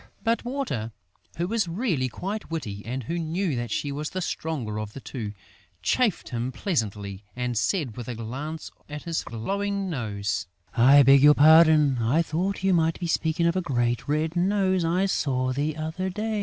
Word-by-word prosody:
But 230 0 +1
Water, 240 - -3 0.5
who 170 +1 -1
was 220 -2 0
really 165 - -1
quite 200 - -5
witty 105 -12 -4
and 130 +3 -4
who 170 +9 -3
knew 165 0 -1
that 120 -1 -3
she 140 +6 -2
was 150 +2 -3
the 185 - -4
stronger 140 - -3
of 110 -1 -6
the - - -7
two, 115 -6 -6 0.5
chaffed 240 -7 +1
him 120 +1 -2
pleasantly 105 - -3
and 125 -1 -2
said, 125 - 0
with 120 - -7
a 125 - -4
glance 135 +8 -6 0.2
at 150 0 -6
his 170 -2 -2
glowing 195 - -3
nose: 105 - -2 0.3
"I 135 +4 +7
beg 135 +1 +7
your 150 +1 +8
pardon?... 155 -3 +6
I 125 +9 +2
thought 185 +5 -2
you 190 -1 +3
might 165 -1 +2
be 175 - -3
speaking 165 0 0
of 170 +1 +2
a 185 - +1
great 120 -7 -1
red 155 +3 0
nose 190 0 +2
I 175 +4 +2
saw 130 -8 0
the 150 +3 -1
other 160 +4 -3
day!..." 215 +2 -2
155 Hz, 185 wpm, -26 LUFS, 120-180 Hz, 0.5 s, your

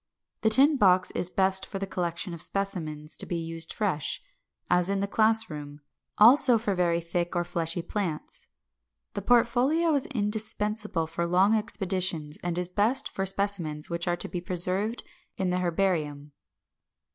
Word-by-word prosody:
The 220 - +3
tin 275 +6 +4
box 185 -5 +4
is 180 - -2
best 190 0 +2
for 195 - -6
the 195 - -3
collection 175 -1 -3
of 165 - -8
specimens 160 -7 -3
to - - -4
be 175 - -3
used 165 0 -2
fresh, 180 -9 -2 0.5
as 180 +1 +2
in 200 0 0
the 200 - 0
class 220 +2 +5
room; 145 -1 -9 0.4
also 245 +2 +7
for 215 -2 -1
very 175 -2 +1
thick 170 +1 -3
or 175 - +1
fleshy 170 0 -2
plants. 175 -7 -4 0.7
The - - -4
portfolio 250 +8 +2
is 280 -3 0
indispensable 210 - -1
for 165 +2 -3
long 185 +5 +3
expeditions, 185 -8 -1
and 175 -1 -2
is 180 0 -1
best 215 +9 +1
for 195 0 -3
specimens 185 -6 -2
which 170 0 -2
are 175 0 0
to - - -6
be 175 - -5
preserved 185 +6 -1 0.3
in 185 -1 -1
the 180 - 0
herbarium. 165 -5 -1
185 Hz, 160 wpm, -27 LUFS, 170-210 Hz, 0.7 s, also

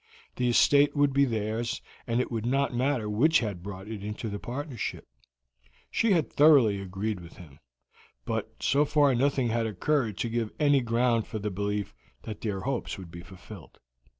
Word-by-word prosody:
The 125 -1 +1
estate 145 +5 +4
would 145 -1 +3
be 140 +1 +4
theirs, 115 0 -2 0.3
and 115 0 +1
it 125 - -1
would 115 -2 -2
not 135 +3 0
matter 125 -2 0
which 140 +10 +3
had 105 - -3
brought 95 +1 -8
it 110 -2 -6
into 105 +2 -5
the 100 0 -5
partnership; 130 0 -5 0.8
she 230 -2 +2
had 160 -9 0
thoroughly 135 -10 +5
agreed 100 +2 -3
with 85 -1 -13
him, 75 -5 -14 0.7
but - - -3
so 140 +2 +3
far 145 -2 +3
nothing 130 0 +1
had 115 0 0
occurred 110 +1 0
to - - -1
give 115 -1 -2
any 145 -2 +4
ground 115 -1 +1
for 110 - -5
the 105 0 -3
belief 100 +1 -3 0.3
that 110 -2 -7
their 100 -4 -3
hopes 135 -1 -3
would 90 -3 -10
be 85 - -9
fulfilled. 95 -1 -13
115 Hz, 180 wpm, -28 LUFS, 105-135 Hz, 0.8 s, thoroughly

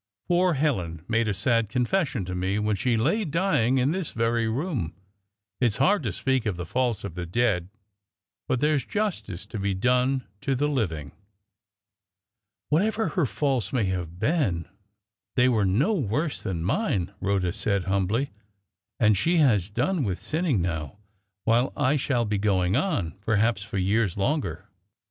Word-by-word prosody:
Poor 175 0 +3
Helen 90 - -1
made 115 0 +1
a - - +1
sad 115 +2 +1
confession 125 - 0
to 90 - -5
me 95 +3 -1
when 105 0 +1
she 115 +4 +1
lay 165 - +1
dying 155 - +1
in 130 +3 +2
this 185 -2 -2
very 115 0 +1
room. 120 - -2 0.6
It's 120 -4 +2
hard 190 +8 +3
to 115 -7 -2
speak 130 +4 0
of 100 -5 -1
the 90 - -4
faults 125 -2 -1
of 100 -4 -5
the 90 0 -5
dead; 95 -3 +1 0.8
but 130 - 0
there's 150 -2 +2
justice 190 - -3
to 110 0 -6
be 100 -1 0
done 125 +5 +1 0.2
to 135 - 0
the 145 +3 +1
living." 80 - -2 1.6
"Whatever 215 +8 +1
her 175 -8 +1
faults 130 -7 0
may 125 -4 +1
have 85 -2 -5
been, 100 - 0 0.7
they 125 -1 +4
were 110 -5 +2
no 125 - +2
worse 150 - -1
than 85 -4 -3
mine," 105 - 0
Rhoda 95 -3 0
said, 100 -2 0
humbly; 100 +8 0 0.7
"and 105 -1 +5
she 170 - +2
has 110 - +3
done 170 - 0
with 95 -5 -1
sinning 155 - 0
now, 80 0 -3 0.5
while 120 +3 +2
I 145 0 +2
shall 125 -4 +1
be 105 -1 -1
going 95 -2 +2
on 145 - 0
perhaps 110 0 +1
for 100 0 -5
years 100 0 +1
longer." 100 - -1
115 Hz, 160 wpm, -26 LUFS, 95-140 Hz, 1.6 s, and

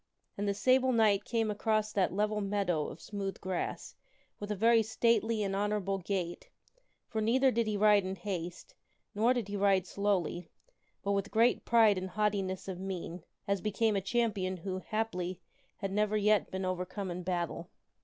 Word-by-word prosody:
And 205 +1 -2
this 200 0 0
Sable 260 +4 +4
Knight 215 -4 +3
came 225 -2 0
across 215 +1 0
that 190 -3 +2
level 210 +2 0
meadow 195 -6 0
of - - -9
smooth 200 -2 -5
grass 185 -2 -4 0.5
with 205 - -6
a 210 - -1
very 225 +3 +5
stately 225 0 +1
and 195 -1 -1
honorable 200 -1 0
gait; 180 -2 -3 0.6
for 220 - -2
neither 260 +5 +3
did 230 -1 0
he 210 -1 0
ride 205 -1 +5
in 190 +1 -3
haste, 175 -2 -5 0.4
nor 225 +3 +3
did 245 -5 0
he 205 - -4
ride 195 -2 +3
slowly, 185 -3 -1 0.5
but 200 - 0
with 200 0 0
great 230 +2 +3
pride 220 -4 +5
and 185 0 -5
haughtiness 195 -2 -1
of 185 -2 -5
mien, 180 -3 -5 0.2
as 200 -2 0
became 215 +2 +1
a 195 - +1
champion 195 -4 0
who, 185 +2 -4
haply, 185 -4 -3 0.4
had 195 -2 -4
never 210 +1 +1
yet 210 0 +3
been 190 0 -3
overcome 185 +1 -3
in 175 +1 -4
battle. 175 -2 -3
200 Hz, 175 wpm, -31 LUFS, 185-215 Hz, 0.6 s, very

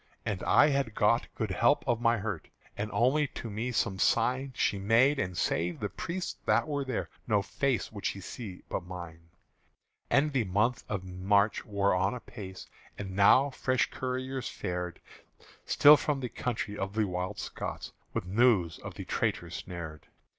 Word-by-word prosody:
And 100 -4 -2
I 145 - +5
had 135 -6 0
got 115 +3 +3
good 110 -4 -2
help 120 +10 +2
of 120 -1 +1
my 120 0 +3
hurt: 100 -5 -4 0.3
And 105 +1 -3
only 140 +5 +3
to 115 -3 -7
me 115 +5 -2
some 105 -4 0
sign 130 +5 +2
She 100 - +1
made; 120 +8 +4
and 90 -2 -2
save 85 0 0
the 105 - -2
priests 170 - -4
that - - +3
were 145 -2 -1
there 130 -4 -3 0.2
No 105 -3 +2
face 130 +5 -1
would 100 -2 -9
she 100 - -3
see 95 0 -8
but - - -2
mine. 85 -2 -9 0.8
And 145 +1 +3
the 125 -5 +1
month 105 +6 +1
of 100 -3 -2
March 100 +3 +1
wore 100 -2 +2
on 95 +4 +1
apace; 105 -5 -9 0.3
And 95 -2 -6
now 130 +8 +6
fresh 130 -1 0
couriers 130 0 -3
fared 90 -1 -4 0.7
Still 150 +1 +8
from 145 -2 -1
the 125 -2 -4
country 110 -4 -3
of 95 +1 -4
the 110 -1 +2
Wild 90 +2 -3
Scots - - -5 0.2
With - - -3
news 95 -4 +3
of - - -8
the - - -7
traitors - - -1
snared. 80 -4 -7
105 Hz, 170 wpm, -30 LUFS, 95-125 Hz, 0.8 s, Still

